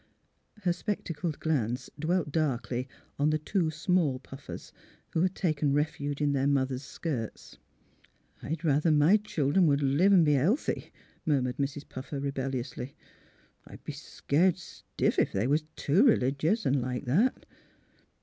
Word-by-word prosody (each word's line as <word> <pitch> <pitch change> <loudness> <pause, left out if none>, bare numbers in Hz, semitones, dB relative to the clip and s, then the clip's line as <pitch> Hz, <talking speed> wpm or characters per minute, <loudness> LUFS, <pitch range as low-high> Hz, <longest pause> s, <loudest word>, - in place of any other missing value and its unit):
Her 175 -2 +2
spectacled 170 -4 -3
glance 130 -5 -1
dwelt 160 -1 0
darkly 130 -4 -1 0.3
on 145 +1 +3
the 155 - +2
two 165 +2 0
small 155 -3 +1
Puffers, 135 +2 -10 0.4
who 160 - +1
had 185 +1 +1
taken 155 -5 +1
refuge 145 -1 -1
in 145 -1 +2
their 135 0 +1
moth 135 -2 +2
er's 130 0 -3
skirts. 140 -5 -5 0.8
''I'd 160 +4 -4
rather 150 +2 +3
my 155 +6 +5
children 170 -4 +1
would 140 -1 +2
live 145 +9 +4
an' 185 -4 +7
be 150 -1 +4
healthy," 170 - 0 0.3
murmured 130 -5 0
Mrs. 140 +1 -3
Puffer, 135 +2 -6
rebelliously. 135 -1 -4 0.4
" - - -31
I'd - - -12
be - - -5
scared 170 +5 +1
stiff 175 - -2
if - - +2
they 100 +3 0
was 150 +4 +1
too 180 - +3
r'ligious, 155 - +2
an' 135 0 +2
like 125 0 -3
that." 190 - +1
145 Hz, 150 wpm, -29 LUFS, 135-165 Hz, 0.8 s, an